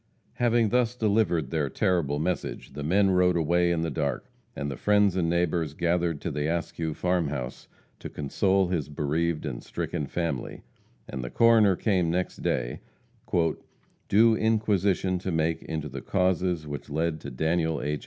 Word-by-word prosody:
Having 120 -2 +3
thus 125 0 +1
delivered 105 -7 +1
their 75 -4 0
terrible 85 -4 0
message, 85 +4 -3
the 75 - -6
men 95 +6 +3
rode 90 -1 +3
away 85 +2 +2
in 85 -1 0
the 85 - -2
dark. 70 -3 -3 0.2
And 70 0 -3
the - - -4
friends 105 +3 +3
and 85 -3 +1
neighbors 85 -3 0
gathered 85 -2 0
to 85 - -3
the 75 +1 -2
Askew 80 -1 -2
farm 90 -3 0
house 65 -4 -5 0.3
to - - -7
console 95 +6 +1
his 80 -6 -2
bereaved 75 +2 -1
and 65 -5 -4
stricken 75 - -4
family, 85 -4 -3 0.4
and 65 - -5
the 60 - -4
coroner 110 - +5
came 90 -4 +1
next 90 +2 -1
day, - - -2 1.3
"due 115 +3 +5
inquisition 100 -4 +1
to 95 +1 -3
make 80 0 0
into 80 -1 -4
the 65 -1 -7
causes 90 -2 0
which 70 -2 -7
led 80 +1 -1
to - - -6
Daniel 80 +4 0
H. 75 0 -2
85 Hz, 165 wpm, -27 LUFS, 75-95 Hz, 1.3 s, coroner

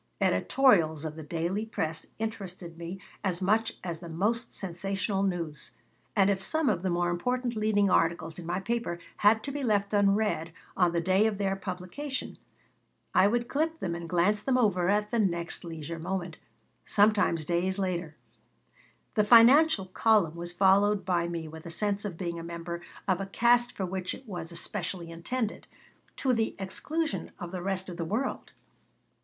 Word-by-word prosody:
Editorials 165 - +3
of 155 -1 -4
the 160 - -7
daily 170 +6 -2
press 160 -8 -3
interested 195 -6 -5
me 170 +3 -7 0.2
as 180 -3 0
much 220 +4 +1
as 170 -3 -4
the 170 -1 -9
most 210 +9 0
sensational 195 +2 -2
news, 170 -7 -2 0.4
and 195 -2 +5
if 190 -1 -1
some 315 +6 +1
of 185 -5 0
the 190 - -1
more 175 0 +1
important 250 +7 -1
leading 215 -2 +2
articles 165 -2 +1
in 170 - -8
my 175 - -1
paper 230 -3 -2 0.2
had 215 +1 +4
to 280 - -4
be 285 0 -4
left 205 -3 +1
unread 200 -5 +2 0.2
on 180 -2 +3
the 170 0 0
day 190 +5 +3
of 215 -2 -2
their 195 -1 0
publication 195 +9 -5 0.8
I 195 - +6
would 240 +3 0
clip 320 +3 0
them 175 - -3
and 170 -1 -6
glance 185 +5 +2
them 255 +2 +1
over 190 -7 +2
at 210 +1 +1
the 235 - +1
next 170 -5 0
leisure 165 -1 -6
moment, 175 -1 -3 0.5
sometimes 205 -6 +3
days 180 +3 0
later 175 -5 -2 1.0
The 215 - +3
financial 240 +2 +7
column 190 -3 +3
was 175 0 -4
followed 195 +2 +3
by 175 -2 +1
me 170 -2 -4
with 160 +1 -10
a - - -6
sense 205 +4 -1
of 185 -5 -4
being 170 -2 -3
a - - -7
member 170 0 -5 0.3
of 190 -1 +1
a 195 - -4
caste 240 +4 +3
for 190 - -3
which 185 0 -3
it 260 - -15
was 175 -4 -5
especially 175 0 -4
intended, 215 +7 -3 0.5
to 260 -2 +1
the 225 -2 0
exclusion 310 +12 -3
of 175 -3 -7
the 185 -1 -4
rest 190 0 -2
of 175 -2 -7
the 170 - -2
world. 225 +10 -2
190 Hz, 175 wpm, -29 LUFS, 170-215 Hz, 1.0 s, financial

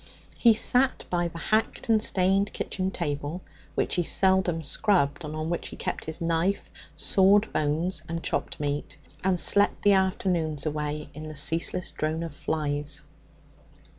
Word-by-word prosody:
He 230 -3 +5
sat 250 +4 +2
by 175 -1 +1
the 170 - -9
hacked 215 +6 0
and 220 -2 +4
stained 195 +1 +2
kitchen 185 -1 -2
table 155 -1 -4 0.3
(which - - 0
he 175 - +2
seldom 190 -2 +2
scrubbed, 175 -2 +1
and 155 0 -5
on 155 +1 -3
which 170 - -2
he - - -9
tried - - -4
his 160 +1 -5
knife, 170 +3 0 0.3
sawed 200 +2 +3
bones, 155 +3 0
and 165 0 -4
chopped - - -2
meat) 145 0 -3 0.3
and 185 -1 +2
slept 205 +3 +3
the 205 - +6
afternoons 180 -6 0
away 150 -1 -3
in 155 +1 -8
the 155 - -8
ceaseless 165 +4 0
drone 155 +2 -2
of 165 -3 -6
flies. 145 -1 -2
165 Hz, 155 wpm, -27 LUFS, 150-190 Hz, 0.3 s, the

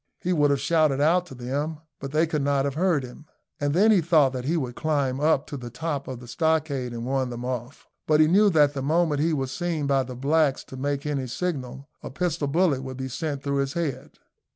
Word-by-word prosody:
He 180 - -1
would 145 -3 +3
have 140 -1 +2
shouted 155 -5 +2
out 170 +5 +3
to 135 - -10
them, 140 +6 -3 0.2
but 135 0 -6
they 155 +2 +3
could 155 -2 -2
not 140 0 +1
have 140 - -1
heard 165 -2 +1
him; 125 +5 -11 0.3
and 145 0 0
then 200 +8 +4
he 200 -5 +5
thought 150 -5 +3
that 125 -1 -4
he 165 +5 +1
would 130 -5 -3
climb 140 -4 0
up 150 -1 +2
to 145 - -6
the 120 -2 -7
top 145 +1 -4
of 130 -3 -6
the 125 - -12
stockade 155 -3 0
and 120 0 -5
warn 130 0 0
them 120 0 -6
off; 125 +1 -5 0.2
but 155 -1 +4
he 155 - +7
knew 200 +6 +5
that 150 -5 +4
the 135 - -3
moment 155 +1 +1
he 165 +2 +2
was 135 -4 -2
seen 160 +1 -2
by 140 -1 +2
the 130 -1 -6
blacks 140 +2 +1
to - - -11
make 140 +2 -2
any 140 -3 -2
signal, 135 -2 -4
a - - -7
pistol 155 0 -1
bullet 155 -2 +2
would 130 -1 -7
be 130 0 -4
sent 140 +1 -4
through 140 -1 -1
his 140 0 -1
head. 155 -7 -4
145 Hz, 240 wpm, -25 LUFS, 130-160 Hz, 0.3 s, he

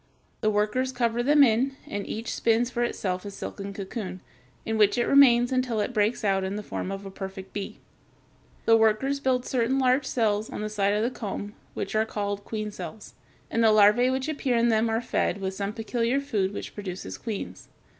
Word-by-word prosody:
The 215 - +1
workers 215 +5 +1
cover 240 -2 0
them 290 +3 +6
in, 260 +3 +2
and 205 0 -5
each 225 +2 -4
spins 235 +2 +1
for 240 - -2
itself 185 -6 -2
a 205 - -6
silken 200 0 -6
cocoon, 195 -1 -6 0.5
in 220 0 -1
which 210 +2 +4
it 240 - +2
remains 245 -3 +6
until 255 -3 0
it 210 +4 -1
breaks 215 +1 +1
out 195 -2 +2
in 190 +1 -2
the 210 - -4
form 195 - -4
of 195 0 -6
a 195 - -7
perfect 190 0 -8
bee. 200 -1 -5 0.9
The 225 - +6
workers 225 +6 +2
build 255 -2 +1
certain 255 +1 +1
large 260 +1 +2
cells 215 -3 0
on - - -5
the 215 - -2
side 205 -1 +1
of 210 - +1
the 240 - 0
comb, 205 -3 -5 0.2
which - - -4
are 215 0 +3
called 205 -2 -3
queen 215 -1 -4
cells, 210 +1 -8 0.4
and 230 - +2
the - - +6
larvæ 215 +4 +5
which 260 +1 -1
appear 275 -5 0
in 235 +1 +3
them 225 0 +2
are 225 +1 0
fed 235 - 0
with 190 -1 -3
some 200 +1 -3
peculiar 230 +4 -1
food 205 -9 -1
which - - -6
produces 190 -3 -6
queens. 220 -4 -6
220 Hz, 205 wpm, -26 LUFS, 205-245 Hz, 0.9 s, them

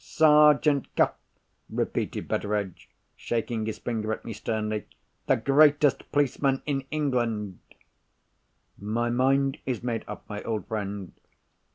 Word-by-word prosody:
Sergeant 150 -2 +4
Cuff!" - - +3 0.6
repeated - - -2
Betteredge, 100 -3 -2 0.3
shaking 115 -1 -2
his 110 - -3
forefinger 110 -2 -3
at - - -8
me 115 - -5
sternly. 105 0 -3 0.4
"The - - +4
greatest 145 +3 +3
policeman 140 -1 +1
in 135 -2 -2
England!" 120 - -1 1.2
"My 115 +4 -1
mind 135 +2 +2
is 125 -3 -2
made 120 -2 -2
up, - - -8
my 105 -1 -5
old 110 -2 -3
friend. 100 -3 -4
120 Hz, 120 wpm, -27 LUFS, 110-140 Hz, 1.2 s, Sergeant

